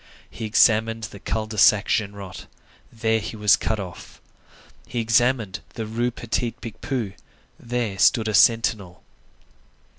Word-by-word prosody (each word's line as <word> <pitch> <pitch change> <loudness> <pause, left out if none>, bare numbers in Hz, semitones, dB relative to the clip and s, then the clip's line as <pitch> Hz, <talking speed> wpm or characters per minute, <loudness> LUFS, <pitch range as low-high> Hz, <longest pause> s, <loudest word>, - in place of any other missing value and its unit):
He 110 - -6
examined 110 0 +3
the 100 -1 -7
Cul 110 +2 -2
de 110 -1 -5
Sac 100 +1 +5
Genrot; 100 -5 -3 0.4
there 110 0 0
he 110 - -6
was 105 -1 +4
cut 110 - -2
off. 90 -3 -9 0.7
He 120 - -3
examined 115 -3 +1 0.2
the 110 - -4
Rue 115 +3 -1
Petit 120 0 -3
Picpus; 115 -2 -4 0.5
there 115 -5 -3
stood 110 +1 +4
a 110 - -1
sentinel. 105 -4 +2
110 Hz, 130 wpm, -23 LUFS, 100-115 Hz, 0.7 s, Sac